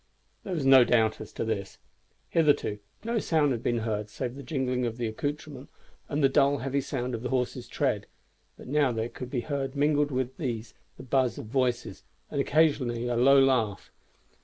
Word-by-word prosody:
There 185 - -3
was 150 -5 -2
no 135 -1 +8
doubt 110 -2 +2
as - - -9
to - - -3
this. 100 -3 -3 0.5
Hitherto 145 -10 +2 0.2
no 230 0 0
sound 155 -7 +2
had 120 -3 -2
been 120 -1 0
heard 105 -1 -2
save 120 +3 -4
the 140 - -9
jingling 130 -3 -1
of 120 0 -3
accouterments 140 +4 -4 0.4
and 145 0 -1
the - - +7
dull 140 +1 +3
heavy 135 +1 -1
sound 125 -2 -3
of 115 - -3
the 125 - -3
horses' 125 -2 -2
tread; - - -1 0.5
but - - -12
now 140 -1 +2
there 115 0 -2
could 125 0 -8
be 125 -2 -1
heard 140 -1 -3
mingled 145 0 +2
with 130 -1 -2
these 115 -7 -4 0.2
the - - -10
buzz 130 -1 +1
of - - -6
voices, 125 +1 -1 0.3
and 140 - 0
occasionally 135 -6 +2
a 120 - 0
low 135 +3 +6
laugh. 125 -7 +1
130 Hz, 185 wpm, -28 LUFS, 120-140 Hz, 0.5 s, no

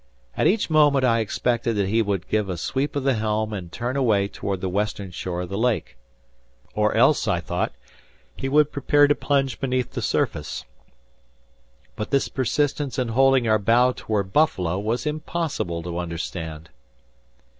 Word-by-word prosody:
At - - +2
each 205 +3 +2
moment, 145 -4 +4
I 115 -2 +3
expected 120 +2 0
that 100 -2 +1
he 115 +2 +3
would 100 -4 -2
give 105 -2 0
a 90 - -3
sweep 135 - -2
of 140 - -1
the 135 0 +3
helm 110 -1 -1
and 90 -4 -6
turn 120 +6 -3
away 110 -7 +2
toward 100 -1 -4
the 95 - -3
western 100 0 -2
shore 90 +1 -4
of 90 - -6
the 100 - -3
lake. 120 - 0 0.8
Or - - +1
else, - - +4
I - - +1
thought, - - -2 0.6
he 135 - -3
would 150 +1 +4
prepare 145 +1 +3
to 145 - +4
plunge 135 -3 0
beneath 130 -2 -1
the - - -4
surface. - - -2 1.3
But 105 -1 -4
this 140 - +1
persistence 140 +2 -1
in 125 -3 0
holding 135 0 +3
our 110 -1 +3
bow 120 +5 +4
toward 100 -3 -2
Buffalo 95 - +2
was 115 +6 -2
impossible 150 - -3
to 85 0 -4
understand! 80 -2 -5
115 Hz, 165 wpm, -23 LUFS, 100-135 Hz, 1.3 s, moment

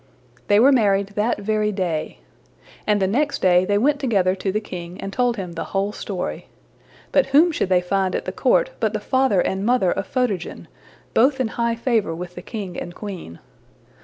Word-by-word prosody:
'' 120 -1 -32
They 205 0 +5
were 265 +5 +6
married 200 -6 +2
that 210 +3 0
very 210 +1 0
day. 175 -6 -3 0.7
And 210 -1 +3
the 190 - +2
next 280 +9 0
day 180 0 +4
they 205 +1 +1
went 280 +6 +2
together 200 -9 +2
to 190 0 -2
the 210 - 0
king 180 -4 -8
and 195 0 -6
told 245 0 +1
him 185 -3 -5
the 165 -1 -5
whole 200 +1 0
story. 195 -3 -5 0.6
But - - +3
whom 300 +6 +5
should 245 - -1
they 180 -1 +4
find 190 0 0
at - - -3
the - - -3
court - - +2
but 220 -2 0
the 215 - -1
father 260 -4 +2
and 190 +1 -1
mother 235 -5 +2
of - - -3
Photogen, 235 -9 -2 0.5
both 265 +4 +3
in 250 -4 0
high 235 +1 -1
favor 230 -8 0
with 180 +1 -7
the - - -8
king 200 -6 -6
and 175 0 -7
queen. 185 - -8
205 Hz, 200 wpm, -22 LUFS, 185-240 Hz, 0.7 s, were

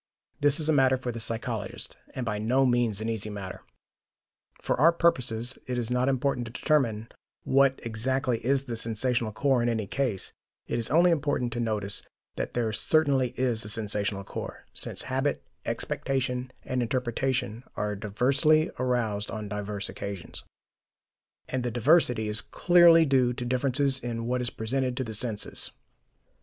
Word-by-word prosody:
This 145 +1 +3
is 155 - 0
a 160 - +4
matter 130 -2 +4
for 125 -1 -4
the 115 - -6
psychologist, 110 -2 -4 0.2
and 130 - -3
by 105 -2 -2
no 125 +5 +2
means 120 -4 +2
an 110 - -2
easy 110 -2 -2
matter. 100 -3 -7 1.0
For - - 0
our 165 +2 +7
purposes, 125 -8 +1
it 125 -1 -2
is 120 -1 -1
not 125 +2 +2
important 130 -2 0
to - - -8
determine 120 -6 +1 0.4
what 135 0 +3
exactly 120 +1 -1
is 135 +2 +2
the 120 -4 -5
sensational 115 +1 0
core 130 +3 +2
in 120 - +1
any 110 -3 -1
case; 110 -5 -2 0.3
it - - -2
is 115 - +2
only 175 +3 +5
important 145 -6 0
to 120 - -3
notice 105 -3 -1 0.3
that - - -4
there 115 -3 0
certainly 135 -2 +2
is 120 -3 +1
a 105 - -6
sensational 105 -2 -2
core, - - -7
since - - 0
habit, 135 +2 -1 0.2
expectation 130 -1 -2
and 130 -1 -1
interpretation 125 -1 -1
are 105 0 -2
diversely 135 +10 +2
aroused 115 -5 0
on 110 -1 -5
diverse 105 0 -4
occasions, 100 -3 -6 1.0
and 130 - -2
the 120 - 0
diversity 120 -2 +3
is 105 0 -1
clearly 170 -2 +6
due 130 -4 +3
to 120 0 -5
differences 135 +2 +1
in 115 -2 -4
what 125 +1 0
is 120 - 0
presented 125 +2 -2
to 130 - 0
the 110 -3 -6
senses. 110 -1 -1
125 Hz, 160 wpm, -28 LUFS, 110-135 Hz, 1.0 s, our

